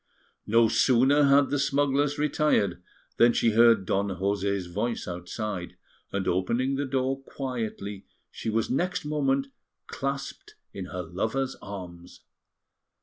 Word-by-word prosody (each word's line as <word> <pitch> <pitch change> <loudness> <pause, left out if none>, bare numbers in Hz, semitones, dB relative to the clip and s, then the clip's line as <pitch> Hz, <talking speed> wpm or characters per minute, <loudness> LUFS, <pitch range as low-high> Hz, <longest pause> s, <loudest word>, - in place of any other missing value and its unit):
No 115 +1 +5
sooner 130 +5 +4
had 140 0 +4
the 145 - +1
smugglers 145 +1 +1
retired 145 - +1 0.4
than 120 0 +6
she 115 - +2
heard 115 -2 +5
Don 100 +2 0
José's 100 0 -1
voice 105 +7 -3
outside; 90 +2 -5 0.4
and 100 -1 -2
opening 115 +9 0
the 140 +1 -1
door 135 0 -1
quietly, 115 -7 -5 0.2
she - - -5
was 110 +1 0
next 180 +4 -1
moment 140 -2 0 0.4
clasped 140 0 -5 0.2
in 95 -2 -5
her 90 0 -5
lover's 110 +10 -2
arms. 90 -3 -9
115 Hz, 125 wpm, -27 LUFS, 100-135 Hz, 0.4 s, than